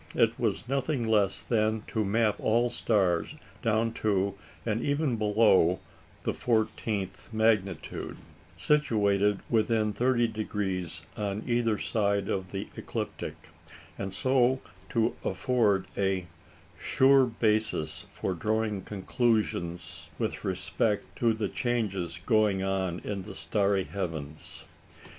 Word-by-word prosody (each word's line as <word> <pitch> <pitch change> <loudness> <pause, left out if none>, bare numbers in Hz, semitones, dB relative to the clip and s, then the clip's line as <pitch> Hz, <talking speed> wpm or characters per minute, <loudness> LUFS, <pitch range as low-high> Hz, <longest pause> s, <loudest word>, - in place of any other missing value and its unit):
It - - +3
was 115 - -1
nothing 135 0 0
less 105 -3 +2
than 110 -1 +1
to 110 - 0
map 105 +1 +2
all 120 +2 +2
stars 95 - +1 0.3
down 115 0 +1
to, 100 -2 +2 0.3
and 110 0 0
even 145 -2 +1
below, 105 -5 +4 0.4
the - - 0
fourteenth 110 -3 -1
magnitude, 110 -5 0 0.4
situated 105 -8 +2
within 110 -1 +2
30° 110 -7 -1 0.2
on 105 0 -2
either 120 -3 +1
side 100 -3 0
of 95 -2 -2
the 100 0 -4
ecliptic, - - -4 0.6
and 95 -1 -4
so 130 +4 +2 0.3
to 115 -2 +1
afford 100 -1 +2
"a 95 -2 0 0.5
sure 135 0 +5
basis 110 -9 0
for 95 - -3
drawing 105 +2 -1
conclusions 100 -4 -1
with - - -2
respect 105 -3 -1
to 115 -1 +3
the 110 -2 -1
changes 95 -7 -2
going 105 -4 +3
on 95 -2 -1
in 100 -2 -3
the 95 0 -9
starry 100 -2 +1
heavens." 80 -7 -6
105 Hz, 110 wpm, -29 LUFS, 95-115 Hz, 0.6 s, sure